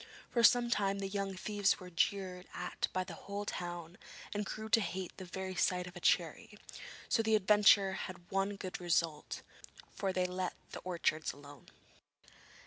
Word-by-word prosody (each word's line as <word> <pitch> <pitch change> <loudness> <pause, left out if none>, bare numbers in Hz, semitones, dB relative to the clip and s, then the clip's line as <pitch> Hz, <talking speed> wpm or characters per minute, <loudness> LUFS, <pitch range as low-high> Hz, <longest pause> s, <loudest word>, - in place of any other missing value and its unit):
For 235 - +2
some 240 0 +6
time 200 -3 +2
the 195 0 -2
young 195 -1 -2
thieves 205 +1 +1
were 180 -1 -10
jeered 180 +1 0
at - - -2
by 185 - 0
the 180 -2 -8
whole 200 +4 -5
town, 175 -1 -5 0.3
and 205 0 -1
grew 215 0 -5
to 225 +1 +5
hate 190 -2 -4
the 185 - -7
very 190 +1 -4
sight 180 0 +1
of 180 0 -10
a - - -6
cherry, - - +1 0.5
so 225 - +3
the 220 -1 +3
adventure 205 -1 +6
had 175 -2 -7
one 195 +1 +1
good 185 -2 -6
result, 165 -3 0 0.5
for 195 -2 -1
they 185 -1 +1
let 180 0 -2 0.2
the - - -6
orchards 170 -3 0
alone. 145 -2 -13
190 Hz, 170 wpm, -34 LUFS, 180-200 Hz, 0.5 s, some